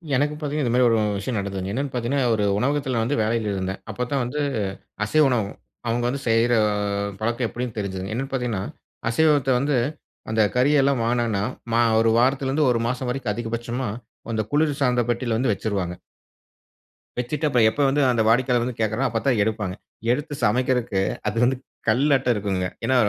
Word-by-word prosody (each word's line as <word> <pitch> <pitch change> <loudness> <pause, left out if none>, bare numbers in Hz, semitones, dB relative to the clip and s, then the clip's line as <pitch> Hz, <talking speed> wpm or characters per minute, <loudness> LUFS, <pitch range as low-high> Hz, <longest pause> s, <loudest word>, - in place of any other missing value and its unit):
எனக்கு 145 +3 +1
பார்த்தீங்கன்னா 150 -1 -2
இந்த 120 - 0
மாதிரி 125 -1 +5
ஒரு 115 - +3 0.2
விஷயம் 110 +4 -3
நடந்ததுங்க. 95 -1 -4
என்னன்னு 140 +3 -2
பார்த்தீங்கன்னா, 125 +1 0
ஒரு 105 -1 0
உணவகத்தில 135 +2 0
நான் 115 -1 +1
வந்து 130 +1 0
வேலையில 110 -1 0
இருந்தேன். 95 0 -3
அப்பத்தான் 125 +5 -2
வந்து, 125 +5 -3 0.6
அசைவ 155 +8 +3
உணவகம். 110 -5 -1 0.3
அவங்க 120 +1 0
வந்து 135 +2 -3
செய்ற 115 +1 +3 0.7
பழக்கம் 120 +2 0
எப்படின்னு 120 +1 -5
தெரிஞ்சுதுங்க. 95 -1 -4
என்னன்னு 135 +4 -3
பார்த்தீங்கன்னா, 120 -7 -1 0.5
அசைவத்த 145 +1 +3
வந்து, 140 0 +1 0.5
அந்த 110 0 +2
கறி 130 +4 +4
எல்லாம் 135 -2 +2
வாங்கினாங்கன்னா, 115 -4 0 0.3
மா 115 - +4 0.2
1 115 0 +3
வாரத்திலிருந்து 135 +3 +2
1 115 -1 +1
மாசம் 125 +1 -2
வரைக்கும் 125 -5 -2
அதிகபட்சமா 120 +2 -3 0.5
அந்த 110 - +1
குளிர்சாதன 145 -4 +2
பெட்டியில 120 -1 0
வந்து 125 -1 +1
வச்சுருவாங்க. 100 -4 -2 1.3
வச்சுட்டு 140 +5 -1
அப்பறம் 120 -6 +4
எப்ப 145 - -2
வந்து 145 +2 +2
அந்த 120 - +1
வாடிக்கையாளர் 120 +1 +3
வந்து 125 -1 -4
கேட்கிறாங்களோ, 110 +4 +1
அப்பத்தான் 115 +1 +1
எடுப்பாங்க. 105 -3 -2 0.4
எடுத்து 145 +3 -2
சமைக்கறதுக்கு 125 -3 +1 0.3
அது 105 +2 -2
வந்து, 130 +2 +3 0.3
கல்லாட்டம் 130 +2 +3
இருக்குங்க. 95 -3 -1 0.2
ஏன்னா 130 - +2
120 Hz, 160 wpm, -23 LUFS, 110-135 Hz, 1.3 s, மாதிரி